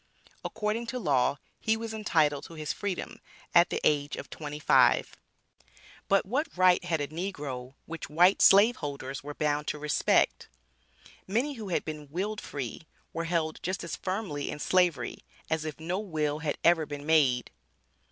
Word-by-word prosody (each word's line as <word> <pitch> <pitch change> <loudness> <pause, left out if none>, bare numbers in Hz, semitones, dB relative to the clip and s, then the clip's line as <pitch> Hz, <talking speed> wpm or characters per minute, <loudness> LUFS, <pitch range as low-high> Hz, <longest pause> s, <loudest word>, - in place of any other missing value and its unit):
According 225 +2 -2
to 250 +2 -3
law 140 - +2 0.2
he 220 0 +1
was 225 0 -5
entitled 155 -9 +1
to 165 - -11
his 155 -1 -3
freedom 200 -3 -4 0.3
at 170 0 +6
the - - -1
age 145 -1 +2
of - - -9
twenty 150 -1 -6
five. 150 - +4 0.9
But 195 0 +3
what 275 +10 0
right 185 -1 +5
had 165 -4 -1
a 145 - -2
negro, 145 -7 -5
which 165 -3 -7
white 175 +6 +4
slave 210 +5 +7
holders 140 -3 -5
were 145 0 -7
"bound 150 0 0
to - - -2
respect?" 150 - +1 0.8
Many 240 +9 0
who 220 -6 -7
had 175 - -1
been 150 -2 -6
willed 195 +7 -3
free, 140 +3 -6 0.3
were 165 0 -2
held 165 -2 -1
just 185 +2 -3
as 170 - -4
firmly 185 -7 -3
in - - -4
Slavery, 170 -6 +1 0.3
as 160 -1 0
if 155 0 -5
no 175 +4 -2
will 155 -7 -2
had 155 -2 -2
ever 165 -3 +4
been 145 -1 -7
made. 140 -6 +3
160 Hz, 165 wpm, -29 LUFS, 145-190 Hz, 0.9 s, slave